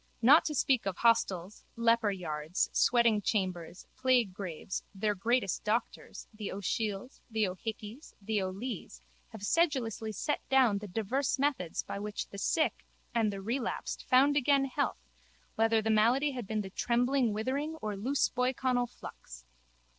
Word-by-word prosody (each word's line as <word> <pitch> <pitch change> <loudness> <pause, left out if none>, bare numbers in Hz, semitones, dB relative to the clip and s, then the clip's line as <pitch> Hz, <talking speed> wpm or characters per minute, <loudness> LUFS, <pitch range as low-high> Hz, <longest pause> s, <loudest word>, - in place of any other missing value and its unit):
Not 280 +7 +7
to 300 - -2
speak 260 -5 +2
of 190 - -2
hostels, 210 -5 +1
leperyards, 195 -9 0
sweating 235 -3 +4
chambers, 185 -4 -2
plaguegraves, 200 -9 0
their 210 +2 0
greatest 225 0 0
doctors, 220 +3 -3
the 215 -1 -5
O'Shiels, 210 +4 -3
the 220 -2 +1
O'Hickeys, 215 - -7
the 210 0 -1
O'Lees, 190 - -5 0.3
have 220 -3 -10
sedulously 240 - +1
set 295 +8 -1
down 255 -7 +4
the 210 - -7
divers 225 +9 -1
methods 265 - -1
by - - -5
which 210 0 -5
the 200 - -8
sick 315 +9 0 0.3
and 225 -3 +2
the 195 -1 -6
relapsed 235 +5 -3
found 275 +3 +5
again 280 -1 +3
health 65 - -2 0.5
whether 225 0 +2
the 220 - +1
malady 240 +7 +3
had 245 -6 -6
been 215 0 -1
the 190 -2 -7
trembling 245 +2 +1
withering 270 +9 -2
or 215 -9 -4
loose 260 +8 +1
boyconnell 250 0 0
flux. - - -11
225 Hz, 140 wpm, -31 LUFS, 200-255 Hz, 0.5 s, Not